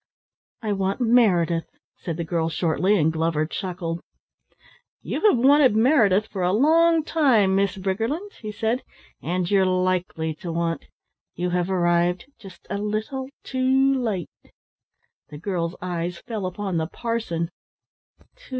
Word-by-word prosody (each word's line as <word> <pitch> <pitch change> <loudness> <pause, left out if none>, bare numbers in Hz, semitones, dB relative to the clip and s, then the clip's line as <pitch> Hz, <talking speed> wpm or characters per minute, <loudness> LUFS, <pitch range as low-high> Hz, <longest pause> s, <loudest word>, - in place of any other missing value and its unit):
"I 210 -2 0
want 195 +2 -1
Meredith," 190 -9 +3 0.3
said 165 -3 -5
the 170 - -2
girl 165 0 -1
shortly, 180 +5 +1
and 160 -2 +2
Glover 160 -1 0
chuckled. 175 -1 -4 1.0
"You - - -3
have 260 - +3
wanted 265 -1 +5
Meredith 220 -5 +4
for 200 -3 -6
a 180 0 +2
long 325 +6 +4
time, 245 -13 +3
Miss 195 0 +1
Briggerland," 225 - -2
he 215 - -5
said, 225 +4 -1 0.4
"and 180 +2 -2
you're 195 -1 +4
likely 180 -3 0
to 175 -3 -6
want. 165 0 -2 0.5
You 180 +1 -2
have 180 0 0
arrived 175 -1 +1
just 195 -3 -14
a 200 - -3
little 215 +6 -3
too 265 +1 +2
late." 220 - -1 1.0
The 150 - -9
girl's 170 0 -3
eyes 175 -1 -3
fell 210 -3 -4
upon 190 -1 -3
the 160 0 -1
parson. 185 -6 -3
190 Hz, 135 wpm, -24 LUFS, 170-230 Hz, 1.0 s, wanted